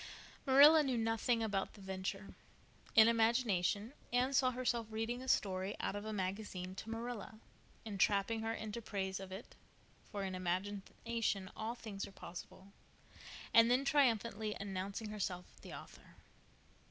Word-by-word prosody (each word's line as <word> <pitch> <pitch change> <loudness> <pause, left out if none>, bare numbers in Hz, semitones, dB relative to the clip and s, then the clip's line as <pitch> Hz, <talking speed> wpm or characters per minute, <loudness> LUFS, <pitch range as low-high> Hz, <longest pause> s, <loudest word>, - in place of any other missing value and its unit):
Marilla 290 +4 +9
knew 265 -4 0
nothing 225 +1 +1
about 200 -3 -1
the - - -14
venture. 190 +1 -4 0.6
In 220 0 +9
imagination 225 -2 +2 0.2
Anne 250 +3 +2
saw 255 -1 +4
herself 240 -2 -1
reading 225 +3 -2
a 260 - -8
story 190 -3 +1
out - - -2
of 205 +1 -5
a 220 - -3
magazine 190 -2 -3
to 215 - -8
Marilla, 225 -1 -5 0.5
entrapping 205 +1 +1
her 225 0 -1
into 220 0 -4
praise 190 -3 -3
of 190 -1 -8
it—for 200 0 -10
in 190 -1 -3
imagination 195 +3 -2
all 225 +2 -3
things 210 -4 -6
are - - -12
possible—and 195 +5 -2
then 255 +3 +3
triumphantly 230 -7 +2
announcing 200 +2 -4
herself 190 -4 -3 0.2
the - - -10
author. - - -12
215 Hz, 135 wpm, -36 LUFS, 195-235 Hz, 0.6 s, Marilla